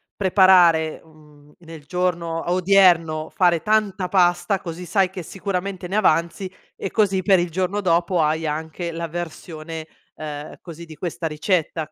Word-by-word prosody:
preparare, 180 -5 +4
mhmm, 150 -2 -21
nel 165 -3 -12
giorno 175 -1 -2
odierno 175 -4 +3
fare 175 -5 +2
tanta 210 -3 0
pasta, 180 +1 +2
così 175 +1 -7
sai 190 +2 +1
che 185 -1 -7
sicuramente 185 0 -5
ne 200 - -1
avanzi 170 0 +1 0.3
e 195 - -5
così 195 -4 +1
per 190 -2 +4
il 175 0 -1
giorno 185 +4 -1
dopo 175 -1 +1
hai 155 +1 0
anche 160 +3 -4
la 165 0 -5
versione, 160 -1 -7 0.3
uhm, 150 -1 -7
così 170 -1 -10
di 160 -1 -12
questa 170 +1 -4
ricetta 155 0 -2
175 Hz, 145 wpm, -22 LUFS, 160-185 Hz, 0.3 s, preparare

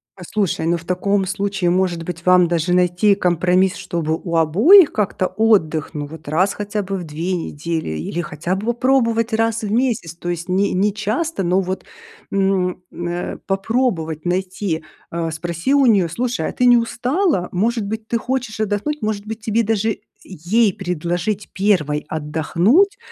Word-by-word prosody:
Послушай, 185 -2 -2
ну 170 +1 +2
в 165 - -11
таком 190 +3 0
случае, 195 -2 -1
может 180 -1 +1
быть, 165 -1 -7
вам 180 -1 +5
даже 170 +1 0
найти 180 +3 +3
компромисс, 180 0 +2
чтобы 160 -2 -2
у 170 -1 -3
обоих 230 - +6
как-то 195 -3 -1
отдых? 195 -9 +1
Ну 145 -1 -4
вот 160 +1 -12
раз 180 +7 +1
хотя 205 0 -3
бы 195 0 -4
в 180 - -5
2 165 +4 -3
недели, 165 - -3
или 80 - -3
хотя 160 +3 -3
бы 200 +4 -5
вот 240 0 0
попробовать 235 -3 +2
раз 225 0 +1
в 210 -2 -3
месяц. 225 -9 0
То 175 +1 -6
есть 175 +1 -4
не 195 +2 +1
не 200 +3 +2
часто, 215 +6 -2
но 180 +2 +2
вот, 185 0 -4 0.5
м, 190 -2 0
э, 175 0 -4
попробовать 195 - -1
найти, 180 -2 -2 0.3
э, 165 -1 -2
спроси 170 - -2
у 280 -1 +4
нее: 200 -8 +4
"Слушай, 245 +8 -2
а - - -3
ты 250 - 0
не 245 -1 +7
устала? 245 - 0
Может 220 +4 0
быть, 220 +2 -5
ты 235 - 0
хочешь 245 -2 -3
отдохнуть?" 215 +8 -1
Может 210 -1 -2
быть, 220 0 -6
тебе 220 +1 +1
даже 220 0 0 0.2
ей 195 +5 +1
предложить 180 +3 -3
1 170 -7 +1
отдохнуть, 170 - +2
190 Hz, 170 wpm, -20 LUFS, 170-220 Hz, 0.5 s, не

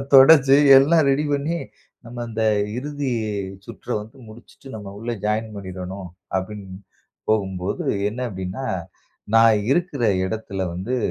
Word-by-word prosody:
தொடச்சி 135 0 +8 0.2
எல்லாம் 160 +4 +4
ரெடி 145 +3 +1
பண்ணி, 145 +4 -1 0.5
நம்ம 120 +1 -7
அந்த 110 0 -3 0.4
இறுதி 145 -1 -3 0.5
சுற்ற 115 - -13
வந்து 110 +4 -12
முடிச்சுட்டு 120 +4 -15
நம்ம 100 -2 -8
உள்ளே 115 +2 -3
ஜாயின் 110 +1 -1
பண்ணிடணும். 95 0 -7 0.3
அப்படின்னு 95 -1 -6 0.5
போகும்போது 95 -2 -1 0.2
என்ன 115 +4 -6
அப்படின்னா, 95 +7 -5 0.7
நான் 115 -2 +5
இருக்கிற 165 -6 -1 0.2
இடத்தில 100 -2 -4
வந்து 105 +9 -3
110 Hz, 120 wpm, -22 LUFS, 100-135 Hz, 0.7 s, தொடச்சி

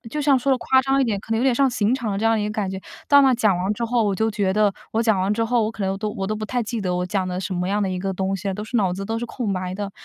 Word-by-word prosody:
就 300 - -2
像 275 -2 +4
说 275 +3 0
得 - - +3
夸 260 +1 +3
张 270 +1 +2
一 270 - +3
点， 210 -4 -1
可 225 - -6
能 225 - +1
有 - - 0
点 265 -2 +3
上 275 +1 +3
刑 230 -1 0
场 235 -6 -1
的 195 - -2
这 220 - -2
样 225 0 +3
的 215 - 0
一 - - -1
个 210 - -3
感 205 -3 -2
觉。 190 - -5 0.3
到 285 0 +7
那 270 - +5
儿 255 - +3
讲 215 -6 +2
完 190 +4 -1
之 235 - -3
后， 230 -1 +1
我 200 -2 +1
就 220 +3 0
觉 200 -3 0
得 210 -1 +3 0.2
我 225 +1 +1
讲 220 -5 +2
完 200 +3 +1
之 230 - 0
后， 230 -1 +1
我 220 - -2
可 205 -3 -4
能 195 0 -1
都 215 +1 -2
我 200 -3 -4
都 215 +2 -2
不 215 - -4
太 245 +1 -1
记 225 +1 -4
得 180 -2 -1
我 180 0 -1
讲 185 +1 -1
的 180 0 -3
什 190 - -4
么 180 +1 -2
样 205 +1 0
的 190 - -1
一 185 - -3
个 195 +1 -2
东 190 +1 -1
西 195 - -7
了， 195 - -1
都 210 - -5
是 230 +3 -3
脑 190 -5 +2
子 195 +2 -4
都 225 +2 -2
是 240 - -4
空 230 -4 -3
白 185 0 -3
的。 200 0 -4
210 Hz, 420 characters per minute, -22 LUFS, 195-235 Hz, 0.3 s, 到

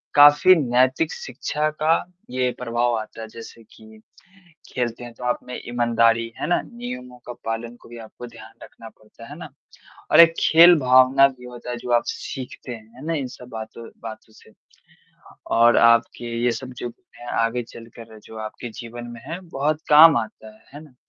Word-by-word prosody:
काफ़ी 145 +6 +7
नैतिक 130 +2 +1
शिक्षा 150 +4 -3
का 160 +2 +2 0.3
ये 125 -1 0
प्रभाव 120 0 -1
आता 110 +1 -9
है। 110 - -7
जैसे 115 +1 -12
कि 110 0 -17 0.7
खेलते 120 -1 -3
हैं, 120 -1 -10
तो 125 - -13
आप 125 - 0
में 125 - -6
ईमानदारी 115 -1 +1
है - - -3
ना 175 - +1
नियमों 125 - -9
का 120 - -6
पालन 115 +1 -4
को - - -17
भी 120 - -10
आपको 115 +2 -11
ध्यान 115 0 -14
रखना - - -13
पड़ता - - -17
है - - -9
ना? - - -9 0.6
और 155 - +8
एक 165 0 +7
खेल 170 +2 +7
भावना 130 +1 +5
भी 130 -2 -14
होता 125 0 -9
है, 120 - -3
जो 120 +1 -8
आप 120 - +3
सीखते 130 -1 -7
हैं 110 -2 -11
है 135 - -11
ना, 165 - -1
इन 140 -4 -2
सब 125 0 -13
बातों 110 0 -8 0.2
बातों 110 -1 -10
से। 110 - -20 1.0
और 120 +1 +5
आपके 115 +1 +3 0.2
ये 120 - +2
सब 130 +1 -7
जो 120 - -5 0.5
आगे 115 +2 0
चलकर 115 -1 -13
जो 110 - -12
आपके 110 +3 -7
जीवन 120 0 -9
में 115 - -11
है 170 - -5
बहुत 150 +2 -1
काम 155 0 +8
आता 110 -1 -8
है, - - -24
है 145 - -9
ना। 140 - -20
120 Hz, 185 wpm, -22 LUFS, 115-135 Hz, 1.0 s, और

